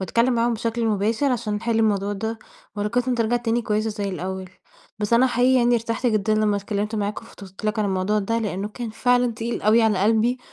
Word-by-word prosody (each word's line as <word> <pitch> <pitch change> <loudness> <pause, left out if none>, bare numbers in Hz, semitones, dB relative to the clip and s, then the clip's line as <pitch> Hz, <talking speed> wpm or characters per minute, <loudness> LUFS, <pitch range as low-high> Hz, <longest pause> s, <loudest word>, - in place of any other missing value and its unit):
وأتكلم 230 +7 +1
معاهم 235 0 +1
بشكل 230 +1 -2
مباشر، 220 +6 +1
عشان 225 -3 -2
نحل 225 +2 -1
الموضوع 205 -2 +1
ده، 220 +3 -4 0.4
وعلاقتنا 245 +5 0
ترجع 235 0 +1
تاني 235 0 -1
كويسة 215 +1 -1
زي 205 -2 -3
الأول. 185 +1 -5 0.5
بس 210 +2 -2
أنا 240 +3 +5
حقيقي 250 +1 +3
يعني، 240 0 +3
ارتحت 230 +2 -1
جدًا 215 -2 +1
لما 215 -1 +2
اتكلمت 205 +2 -3
معاك 210 +1 -2
وفضفت 195 -3 -13
لك 215 +1 -1
عن 215 - +1
الموضوع 195 +2 0
ده، 230 +3 -1
لأنه 205 -2 -3
كان 230 +1 -6
فعلًا 245 +2 +2
تقيل 230 +1 -4
أوي 225 +2 +4
على 215 -4 +2
قلبي، 225 +4 +2
220 Hz, 200 wpm, -23 LUFS, 205-235 Hz, 0.5 s, أنا